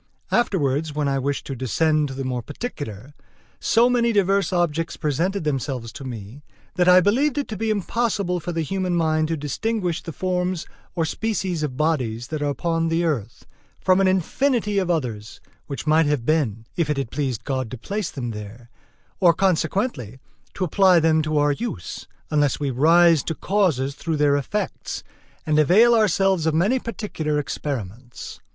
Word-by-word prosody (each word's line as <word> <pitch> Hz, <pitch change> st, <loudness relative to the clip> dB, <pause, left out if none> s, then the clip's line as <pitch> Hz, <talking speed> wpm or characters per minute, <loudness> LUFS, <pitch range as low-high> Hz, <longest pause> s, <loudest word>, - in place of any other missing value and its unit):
Afterwards 155 Hz, -, +1 dB
when 150 Hz, -1 st, 0 dB
I 135 Hz, 0 st, +1 dB
wished 140 Hz, +1 st, -2 dB
to 135 Hz, -, -5 dB
descend 150 Hz, +5 st, +1 dB
to 135 Hz, -, -7 dB
the 135 Hz, -, -4 dB
more 125 Hz, -1 st, -2 dB
particular, 145 Hz, -, -7 dB, 0.5 s
so 230 Hz, +2 st, +4 dB
many 240 Hz, -1 st, +2 dB
diverse 200 Hz, -1 st, +2 dB
objects 165 Hz, -2 st, 0 dB
presented 170 Hz, +6 st, -1 dB
themselves 135 Hz, -5 st, -2 dB
to 135 Hz, -, -9 dB
me, 120 Hz, +1 st, -8 dB, 0.3 s
that 180 Hz, 0 st, +1 dB
I 180 Hz, 0 st, +8 dB
believed 255 Hz, -, +2 dB
it 285 Hz, -, -1 dB
to 215 Hz, -, -4 dB
be 220 Hz, +3 st, -2 dB
impossible 205 Hz, -3 st, 0 dB
for 175 Hz, -, -4 dB
the 165 Hz, -1 st, -1 dB
human 185 Hz, +1 st, -1 dB
mind 155 Hz, -2 st, +1 dB
to 165 Hz, 0 st, -2 dB
distinguish 175 Hz, -, -2 dB
the 165 Hz, -, -7 dB
forms 180 Hz, 0 st, -2 dB, 0.3 s
or 165 Hz, -2 st, +1 dB
species 190 Hz, -3 st, -2 dB
of 140 Hz, -4 st, -3 dB
bodies 125 Hz, -7 st, -1 dB
that 155 Hz, -1 st, -3 dB
are 145 Hz, -, 0 dB
upon 165 Hz, +3 st, -1 dB
the 165 Hz, +1 st, +1 dB
earth, 120 Hz, -8 st, -3 dB, 0.3 s
from 185 Hz, 0 st, +3 dB
an 195 Hz, -, +4 dB
infinity 210 Hz, -, +1 dB
of 185 Hz, -2 st, -1 dB
others 120 Hz, -10 st, -3 dB, 0.3 s
which 140 Hz, -1 st, -5 dB
might 155 Hz, 0 st, +4 dB
have 145 Hz, -5 st, 0 dB
been, 125 Hz, -9 st, 0 dB
if 165 Hz, -4 st, 0 dB
it 150 Hz, -, 0 dB
had 135 Hz, -4 st, -3 dB
pleased 135 Hz, -6 st, -2 dB
God 130 Hz, -4 st, -2 dB
to 130 Hz, -, -6 dB
place 200 Hz, -, -3 dB
them 120 Hz, -4 st, -5 dB
there, 110 Hz, +3 st, -9 dB, 0.5 s
or 175 Hz, -3 st, +5 dB
consequently 180 Hz, -, 0 dB, 0.4 s
to 190 Hz, -, -2 dB
apply 185 Hz, 0 st, +4 dB
them 160 Hz, -1 st, +3 dB
to 155 Hz, 0 st, -1 dB
our 145 Hz, 0 st, +3 dB
use, 145 Hz, -, -5 dB, 0.2 s
unless 145 Hz, -2 st, +2 dB
we 140 Hz, -2 st, -1 dB
rise 165 Hz, +4 st, +5 dB
to 165 Hz, -, -2 dB
causes 160 Hz, -10 st, +1 dB
through 160 Hz, +2 st, -3 dB
their 145 Hz, -1 st, +3 dB
effects, 190 Hz, +8 st, -3 dB, 0.4 s
and 155 Hz, -1 st, +2 dB
avail 210 Hz, +10 st, +6 dB
ourselves 195 Hz, -5 st, +2 dB
of 160 Hz, -, +1 dB
many 205 Hz, +11 st, +2 dB
particular 200 Hz, -11 st, -3 dB
experiments. 125 Hz, -5 st, -5 dB
160 Hz, 175 wpm, -23 LUFS, 140-190 Hz, 0.5 s, I